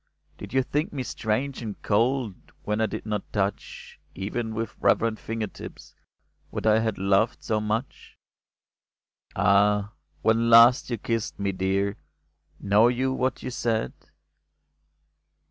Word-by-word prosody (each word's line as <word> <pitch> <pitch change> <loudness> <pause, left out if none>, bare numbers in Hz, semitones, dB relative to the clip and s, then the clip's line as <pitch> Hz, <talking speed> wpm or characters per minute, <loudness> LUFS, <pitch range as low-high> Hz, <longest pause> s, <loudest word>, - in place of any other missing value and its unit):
Did - - -9
you 130 0 +2
think 150 +4 -2
me 135 -3 -3
strange 125 +4 -2
and 110 -4 -6
cold 115 +1 +1 0.3
When 105 +1 -1
I 110 - +2
did - - -6
not 105 -2 -4
touch, 100 -1 -4 0.2
Even 110 +4 -4
with 115 -1 -4
reverent 115 -1 +2
finger 115 -1 -3
tips, 100 - -11 0.6
What - - -5
I 110 0 +5
had 110 -2 -1
loved 100 +5 +1
so 110 - 0
much? 110 +5 -4 1.2
Ah! 105 +1 +3 0.3
when 115 +1 +3
last 115 +3 +7
you 120 - -1
kissed 115 0 -3
me, 100 -1 0
dear, 95 +1 -1 0.6
Know 105 +3 +4
you 130 +2 0
what 130 0 -1
you 130 - -4
said 115 - -1
110 Hz, 135 wpm, -26 LUFS, 105-120 Hz, 1.2 s, last